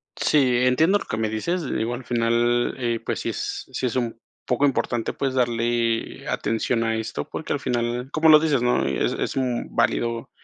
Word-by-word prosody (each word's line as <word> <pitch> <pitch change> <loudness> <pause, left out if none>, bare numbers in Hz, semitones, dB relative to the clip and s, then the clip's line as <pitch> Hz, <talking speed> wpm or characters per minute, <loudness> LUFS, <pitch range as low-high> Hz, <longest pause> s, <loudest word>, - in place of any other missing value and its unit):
Sí, 130 -5 +3
entiendo 160 +10 +4
lo - - -8
que 110 - -3
me 110 -1 0
dices, 170 +11 -2
digo 120 -3 -2
al 125 +1 -6
final 120 +1 +1
eh, 120 -2 -1
pues - - -2
si - - -2
es - - -4
si 130 - -2
es 125 - -1
un 120 -2 -2 0.3
poco 125 +3 +2
importante, 120 -4 0
pues 135 -1 -2
darle 120 -1 0
atención 115 +1 0
a 115 0 0
esto, 110 -10 -4
porque, - - -4
al - - -2
final, 120 +2 -2
como 160 0 +3
lo 155 -1 +9
dices, 145 -6 +1
¿no? 120 - +2
Es 70 - 0
es, - - -3
mm, 125 -2 -2
válido 115 0 0
120 Hz, 195 wpm, -23 LUFS, 115-130 Hz, 0.3 s, lo